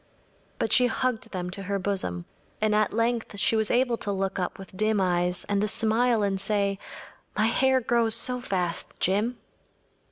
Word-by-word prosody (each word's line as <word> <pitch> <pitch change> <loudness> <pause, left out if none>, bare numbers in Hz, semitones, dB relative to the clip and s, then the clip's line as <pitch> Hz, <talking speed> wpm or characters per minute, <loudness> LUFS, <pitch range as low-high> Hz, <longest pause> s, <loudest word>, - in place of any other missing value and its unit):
But - - +1
she 250 -1 +5
hugged 245 -1 -1
them 180 -3 -4
to 195 - -2
her 200 +1 -2
bosom, 185 - -2 0.3
and 215 0 +1
at 215 0 +2
length 230 -1 -1
she 205 - +2
was 220 -1 +2
able 245 -1 +2
to 205 - -3
look 195 0 -2
up 180 - -3
with 190 -1 -12
dim 215 +1 +1
eyes 180 -1 +1
and 200 0 0
a - - +1
smile 225 +2 +2
and 195 -1 0
say: 200 -1 0 0.6
“My 215 - +3
hair 260 +3 +3
grows 230 -1 +1
so 250 +2 +2
fast, 180 -7 -2
Jim! 210 +7 +1
210 Hz, 180 wpm, -26 LUFS, 195-230 Hz, 0.6 s, she